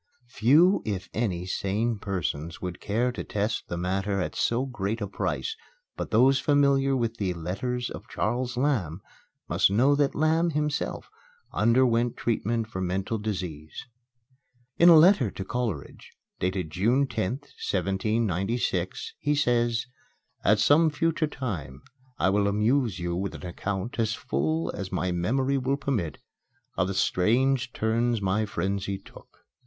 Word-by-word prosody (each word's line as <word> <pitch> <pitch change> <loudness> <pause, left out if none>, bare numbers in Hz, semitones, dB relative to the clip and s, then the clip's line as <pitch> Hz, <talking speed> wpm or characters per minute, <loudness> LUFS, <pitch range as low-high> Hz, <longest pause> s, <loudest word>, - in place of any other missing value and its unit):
Few, 150 - +4
if 100 -3 -4
any, 95 -6 -1
sane 105 +4 -1
persons 85 -5 -3
would 90 -1 -6
care 120 +5 0
to 125 - -5
test 105 +2 -2
the 85 - -4
matter 95 +3 -1
at 90 - -3
so 120 +3 +1
great 110 -4 -3
a 105 - -2
price; 440 - -3 0.4
but - - -4
those 130 +5 +4
familiar 140 -1 +3
with 115 -2 -2
the 95 -4 -1
"Letters 120 +9 -3
of - - -9
Charles 125 0 -2
Lamb" 110 - 0 0.5
must - - +3
know 125 +8 +4
that 145 -1 +1
Lamb, 160 +2 +2
himself, 150 0 -2 0.4
underwent 120 +1 +3
treatment 115 0 -1
for 110 -4 -6
mental 95 +4 -2
disease. 90 -8 -5 0.9
In 170 - +8
a 170 - +9
letter 155 - +6
to 95 - -7
Coleridge, 110 - -4 0.3
dated 90 -3 -2
June 115 - +2
10th, 125 +2 -3 0.2
1796, 95 0 -1
he 150 0 +1
says: 120 -4 +1 0.6
"At 105 - +4
some 155 +8 +5
future 160 +1 0
time 90 - -5 0.3
I 95 - +2
will 100 0 +2
amuse 110 +2 +1
you 85 -1 -2
with 95 +2 -3
an - - -9
account, 95 +6 -4
as 110 -1 +1
full 80 +4 -1
as 95 -1 -6
my 90 - -1
memory 130 +10 0
will 135 +2 0
permit, 110 - -2 0.6
of 90 - +1
the 95 - -3
strange 125 +9 +2
turns 115 +1 0
my 100 +2 0
frenzy 100 +1 -2
took. - - -17
110 Hz, 145 wpm, -27 LUFS, 95-130 Hz, 0.9 s, a